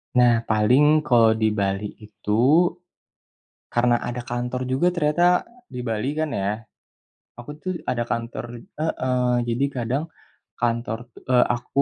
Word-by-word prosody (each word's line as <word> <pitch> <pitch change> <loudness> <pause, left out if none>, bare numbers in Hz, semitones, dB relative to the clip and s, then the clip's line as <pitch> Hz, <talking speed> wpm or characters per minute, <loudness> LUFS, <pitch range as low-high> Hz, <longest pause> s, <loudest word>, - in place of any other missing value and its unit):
Nah, 120 -1 +6
paling 135 +8 +4
kalau 115 -6 +4
di 110 -1 +1
Bali 100 0 -1
itu, 115 - +2 1.0
karena 120 0 +3
ada 120 +1 -4
kantor 125 +1 -3
juga 170 +8 +2
ternyata 175 +2 +3 0.2
di 125 - -7
Bali 120 +4 -2
kan 155 0 -1
ya, 105 -1 -2 0.8
aku 120 - -10
tuh 185 - -2 0.2
ada 120 -1 0
kantor 115 0 -4 0.3
heeh, 125 -5 0 0.2
jadi 120 +4 +1
kadang 130 +3 -2 0.6
kantor 115 0 -2
tu - - -12
eee, 125 -1 +5
aku 120 +3 0
120 Hz, 130 wpm, -23 LUFS, 115-140 Hz, 1.0 s, Nah